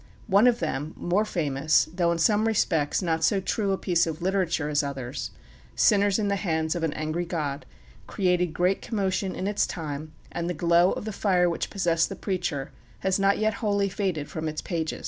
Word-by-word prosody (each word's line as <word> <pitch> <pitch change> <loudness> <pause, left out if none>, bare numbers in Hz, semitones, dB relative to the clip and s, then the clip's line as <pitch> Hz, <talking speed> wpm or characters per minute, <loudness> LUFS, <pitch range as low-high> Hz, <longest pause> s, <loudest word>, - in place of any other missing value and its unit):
One 205 +3 +5
of 240 -1 +4
them, 155 -1 -3
more 190 +5 +1
famous, 155 -5 +1
though 175 -1 +1
in 170 - 0
some 210 +6 +3
respects 165 -7 +1
not 160 -2 0
so 195 +5 +3
true 195 +1 -1
a 195 - +1
piece 175 -3 +1
of 160 0 -4
literature 180 -4 0
as 150 0 +2
others, 135 -2 -5 0.5
"Sinners 205 -2 +4
in 210 -2 0
the 200 0 +1
Hands 160 -4 0
of 175 - -3
an 160 -2 0
Angry 155 +3 -2
God," 155 -5 -3 0.4
created 180 -2 +1
great 180 +4 0
commotion 195 -3 -1
in 185 - -4
its 205 +1 +1
time, 155 -2 -6 0.2
and 170 0 -3
the 180 - -2
glow 170 +3 +4
of - - -5
the 215 - -4
fire 185 -3 +2
which 170 - -2
possessed 170 -4 +1
the - - -5
preacher 175 -8 -3 0.3
has 190 0 +1
not 195 0 +3
yet 215 0 +1
wholly 200 -2 +1
faded 180 -7 -2
from 160 0 -4
its 155 0 -3
pages. 160 -3 -3
175 Hz, 200 wpm, -26 LUFS, 160-195 Hz, 0.5 s, One